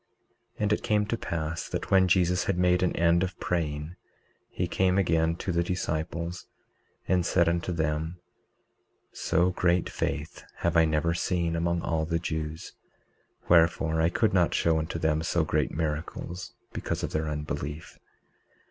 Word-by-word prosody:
19:35 -, -, -11 dB
And 105 Hz, 0 st, +3 dB
it -, -, -1 dB
came 105 Hz, -2 st, +2 dB
to 110 Hz, -, -1 dB
pass 80 Hz, -6 st, -4 dB
that -, -, -4 dB
when 95 Hz, -1 st, +5 dB
Jesus 90 Hz, 0 st, +2 dB
had 100 Hz, -, 0 dB
made 90 Hz, 0 st, +3 dB
an 90 Hz, -, +1 dB
end 85 Hz, 0 st, +3 dB
of 90 Hz, -1 st, -3 dB
praying 80 Hz, -1 st, -2 dB, 0.5 s
he 90 Hz, -, -2 dB
came 95 Hz, +1 st, +2 dB
again 80 Hz, -3 st, +2 dB
to 90 Hz, -, -3 dB
the 85 Hz, 0 st, +1 dB
disciples, 85 Hz, 0 st, -3 dB, 0.6 s
and 90 Hz, -1 st, +2 dB
said 85 Hz, 0 st, +2 dB
unto 85 Hz, +2 st, 0 dB
them: 80 Hz, +1 st, -2 dB, 0.9 s
So 90 Hz, +1 st, +1 dB
great 90 Hz, -1 st, +1 dB
faith 75 Hz, +2 st, -3 dB, 0.2 s
have 85 Hz, 0 st, +1 dB
I 80 Hz, 0 st, +6 dB
never 80 Hz, +2 st, +1 dB
seen 85 Hz, -1 st, 0 dB
among 85 Hz, 0 st, 0 dB
all 80 Hz, -1 st, 0 dB
the 85 Hz, +1 st, 0 dB
Jews; 80 Hz, -1 st, -4 dB, 0.7 s
wherefore 80 Hz, -1 st, +4 dB
I 80 Hz, -, +3 dB
could 110 Hz, +4 st, +1 dB
not 90 Hz, -3 st, +3 dB
show 80 Hz, -1 st, +2 dB
unto 80 Hz, +2 st, -3 dB
them 80 Hz, -1 st, +1 dB
so 85 Hz, +1 st, +1 dB
great 75 Hz, -2 st, 0 dB
miracles, 80 Hz, +3 st, -4 dB, 0.2 s
because -, -, -3 dB
of -, -, -2 dB
their 80 Hz, 0 st, -1 dB
unbelief. 75 Hz, 0 st, -5 dB
85 Hz, 160 wpm, -28 LUFS, 80-90 Hz, 0.9 s, I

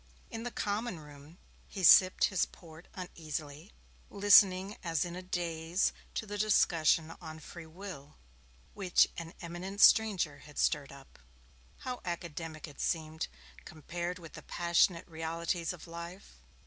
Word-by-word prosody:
In 225 Hz, -, -5 dB
the 245 Hz, -, -3 dB
common 210 Hz, -3 st, -3 dB
room, 150 Hz, +2 st, -14 dB, 0.3 s
he 190 Hz, -, -6 dB
sipped 185 Hz, +1 st, +7 dB
his 190 Hz, -4 st, +2 dB
port 165 Hz, 0 st, -15 dB
uneasily, 155 Hz, -2 st, -7 dB, 0.4 s
listening 200 Hz, -1 st, +5 dB
as 165 Hz, -3 st, 0 dB
in 175 Hz, 0 st, -6 dB
a 180 Hz, -, -6 dB
daze 175 Hz, -1 st, -1 dB, 0.2 s
to -, -, -2 dB
the 205 Hz, 0 st, -6 dB
discussion 165 Hz, -6 st, +3 dB
on 160 Hz, -2 st, -8 dB
Free 165 Hz, +1 st, -10 dB
Will, 160 Hz, -4 st, -10 dB, 0.6 s
which 190 Hz, -3 st, +3 dB
an 165 Hz, 0 st, -8 dB
eminent 180 Hz, +4 st, -6 dB
stranger 190 Hz, -11 st, +5 dB
had 150 Hz, 0 st, -15 dB
stirred 145 Hz, -3 st, +1 dB
up. 140 Hz, -1 st, -15 dB, 0.6 s
How 250 Hz, -1 st, -5 dB
academic 165 Hz, -2 st, -5 dB
it 145 Hz, -, -10 dB
seemed, 160 Hz, 0 st, -2 dB, 0.4 s
compared 175 Hz, +3 st, -5 dB
with 165 Hz, -3 st, -12 dB
the -, -, -9 dB
passionate 170 Hz, 0 st, +1 dB
realities 165 Hz, +1 st, -2 dB
of 180 Hz, -, -10 dB
life. 170 Hz, +3 st, -10 dB
170 Hz, 135 wpm, -32 LUFS, 160-185 Hz, 0.6 s, sipped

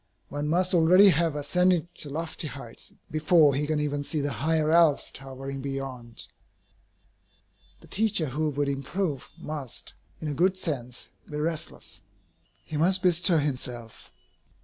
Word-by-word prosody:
One 145 Hz, +1 st, -3 dB
must 180 Hz, +4 st, +2 dB
already 180 Hz, +4 st, +7 dB
have 165 Hz, -2 st, +2 dB
ascended 175 Hz, +3 st, +1 dB
to 145 Hz, -, -6 dB
lofty 160 Hz, +2 st, -3 dB
heights 135 Hz, -5 st, -9 dB, 0.2 s
before 155 Hz, -1 st, +4 dB
he 145 Hz, +2 st, -1 dB
can 155 Hz, -1 st, 0 dB
even 145 Hz, -1 st, -1 dB
see 155 Hz, +2 st, -1 dB
the 145 Hz, 0 st, -1 dB
higher 155 Hz, +1 st, +1 dB
Alps 165 Hz, -3 st, +4 dB
towering 135 Hz, 0 st, -7 dB
beyond. 130 Hz, -4 st, -5 dB, 1.5 s
The -, -, -15 dB
teacher 205 Hz, -5 st, +1 dB
who 155 Hz, +4 st, -1 dB
would 145 Hz, 0 st, -1 dB
improve 140 Hz, +1 st, -2 dB
must, 150 Hz, -6 st, -5 dB, 0.3 s
in 155 Hz, -, -5 dB
a 150 Hz, -, -2 dB
good 185 Hz, +6 st, +2 dB
sense, 130 Hz, -9 st, -4 dB, 0.2 s
be 150 Hz, -, -5 dB
restless. 155 Hz, -, -4 dB, 0.6 s
He 155 Hz, -, -4 dB
must 185 Hz, +4 st, +3 dB
bestir 175 Hz, -2 st, +5 dB
himself. 125 Hz, -5 st, -4 dB
150 Hz, 140 wpm, -27 LUFS, 140-170 Hz, 1.5 s, already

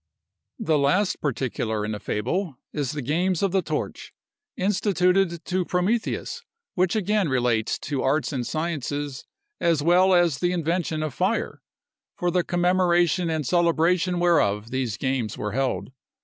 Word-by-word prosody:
The 160 Hz, -10 st, +1 dB
last 180 Hz, +8 st, +1 dB
particular 115 Hz, -5 st, -2 dB
in 105 Hz, -, -3 dB
the 105 Hz, -, -4 dB
fable 135 Hz, -, -2 dB, 0.2 s
is 145 Hz, -1 st, -2 dB
the 145 Hz, -3 st, -4 dB
Games 175 Hz, +7 st, 0 dB
of 195 Hz, -, +2 dB
the 190 Hz, 0 st, +2 dB
Torch, -, -, -5 dB, 0.4 s
instituted 185 Hz, -2 st, +1 dB
to 185 Hz, 0 st, 0 dB
Prometheus, 210 Hz, -, -1 dB, 0.3 s
which 185 Hz, +2 st, +1 dB
again 210 Hz, -3 st, +1 dB
relates 120 Hz, -4 st, +1 dB
to 140 Hz, -3 st, -2 dB
arts 150 Hz, +3 st, 0 dB
and 130 Hz, -3 st, -1 dB
sciences, 145 Hz, -2 st, -3 dB, 0.3 s
as 165 Hz, -4 st, +2 dB
well 180 Hz, +3 st, +5 dB
as 170 Hz, -6 st, +3 dB
the 175 Hz, +2 st, +1 dB
invention 165 Hz, -2 st, -1 dB
of 155 Hz, -4 st, -3 dB
fire, 190 Hz, +9 st, -1 dB, 0.6 s
for 175 Hz, 0 st, 0 dB
the 180 Hz, 0 st, +2 dB
commemoration 175 Hz, -1 st, +2 dB
and 160 Hz, -2 st, -1 dB
celebration 175 Hz, +2 st, +2 dB
whereof 115 Hz, -11 st, +2 dB
these 125 Hz, -5 st, -2 dB
games 130 Hz, -5 st, -2 dB
were 105 Hz, -, -3 dB
held. 130 Hz, +2 st, -1 dB
170 Hz, 145 wpm, -24 LUFS, 135-180 Hz, 0.6 s, well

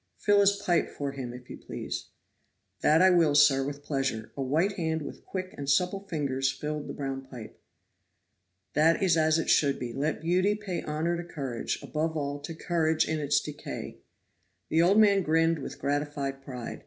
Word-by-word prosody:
"Fill 205 Hz, -1 st, +3 dB
his 200 Hz, 0 st, +5 dB
pipe 195 Hz, -4 st, 0 dB
for 140 Hz, -1 st, -4 dB
him, 130 Hz, -3 st, -6 dB
if 125 Hz, 0 st, -11 dB
you -, -, -8 dB
please." -, -, -6 dB, 0.8 s
"That 160 Hz, +4 st, +5 dB
I 190 Hz, -, +7 dB
will, 165 Hz, -5 st, +4 dB
sir, 145 Hz, -2 st, +5 dB
with 145 Hz, +1 st, -5 dB
pleasure." 135 Hz, -7 st, -2 dB
A -, -, -4 dB
white 155 Hz, +9 st, +1 dB
hand 160 Hz, -5 st, -2 dB
with -, -, -9 dB
quick 185 Hz, -1 st, -5 dB
and 140 Hz, -1 st, -5 dB
supple 180 Hz, +7 st, +1 dB
fingers 135 Hz, -5 st, 0 dB
filled 150 Hz, +1 st, -5 dB
the -, -, -5 dB
brown 135 Hz, -1 st, -4 dB
pipe. 120 Hz, -5 st, -11 dB, 1.1 s
"That 160 Hz, +5 st, +3 dB
is 180 Hz, -4 st, +4 dB
as 160 Hz, 0 st, +3 dB
it 165 Hz, -, -2 dB
should 140 Hz, -2 st, +3 dB
be. 120 Hz, -2 st, -5 dB
Let 150 Hz, +4 st, -2 dB
beauty 185 Hz, +5 st, +2 dB
pay 205 Hz, -4 st, -4 dB
honor 155 Hz, +3 st, -1 dB
to 175 Hz, -, -4 dB
courage; 135 Hz, -8 st, -4 dB
above 160 Hz, +1 st, -2 dB
all 145 Hz, -1 st, -3 dB
to 160 Hz, +3 st, -7 dB
courage 160 Hz, -1 st, +1 dB
in 160 Hz, 0 st, -1 dB
its 145 Hz, 0 st, +2 dB
decay." 145 Hz, -, -7 dB, 0.7 s
The 160 Hz, -, +3 dB
old 185 Hz, +5 st, +4 dB
man 200 Hz, -2 st, +5 dB
grinned 165 Hz, -1 st, +2 dB
with -, -, -7 dB
gratified 140 Hz, -1 st, -2 dB
pride. 125 Hz, -3 st, -7 dB
150 Hz, 185 wpm, -28 LUFS, 140-170 Hz, 1.1 s, I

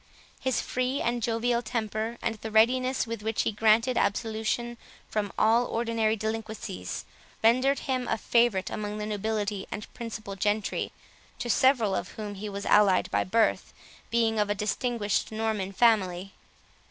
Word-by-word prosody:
His 260 Hz, -3 st, 0 dB
free 255 Hz, +2 st, -1 dB
and 240 Hz, 0 st, -1 dB
jovial 235 Hz, +1 st, +1 dB
temper, 220 Hz, 0 st, -3 dB
and -, -, 0 dB
the 220 Hz, 0 st, -7 dB
readiness 255 Hz, +4 st, +3 dB
with 230 Hz, -2 st, -5 dB
which 220 Hz, +1 st, 0 dB
he -, -, 0 dB
granted 225 Hz, +4 st, +3 dB
absolution 225 Hz, +3 st, -1 dB, 0.3 s
from 205 Hz, -2 st, -2 dB
all 230 Hz, +3 st, +4 dB
ordinary 225 Hz, -1 st, 0 dB
delinquencies, 220 Hz, -, -4 dB, 0.4 s
rendered 255 Hz, +5 st, +4 dB
him 255 Hz, -2 st, -1 dB
a -, -, 0 dB
favourite 230 Hz, -4 st, +2 dB
among 210 Hz, 0 st, -4 dB
the 210 Hz, -, -3 dB
nobility 210 Hz, -1 st, -2 dB
and 210 Hz, -, -7 dB
principal 215 Hz, -4 st, -6 dB
gentry, 205 Hz, +2 st, -1 dB, 0.5 s
to 240 Hz, -, -1 dB
several 245 Hz, -7 st, +3 dB
of 180 Hz, -, -3 dB
whom 210 Hz, -2 st, -6 dB
he 205 Hz, +1 st, -6 dB
was 200 Hz, 0 st, -5 dB
allied 200 Hz, -3 st, +4 dB
by 100 Hz, 0 st, +2 dB
birth, 225 Hz, +3 st, +1 dB, 0.4 s
being 225 Hz, -1 st, +2 dB
of 210 Hz, -1 st, +1 dB
a 205 Hz, -, +1 dB
distinguished 210 Hz, +1 st, -1 dB
Norman 215 Hz, -3 st, -2 dB
family. 195 Hz, -4 st, +2 dB
220 Hz, 150 wpm, -28 LUFS, 210-235 Hz, 0.5 s, all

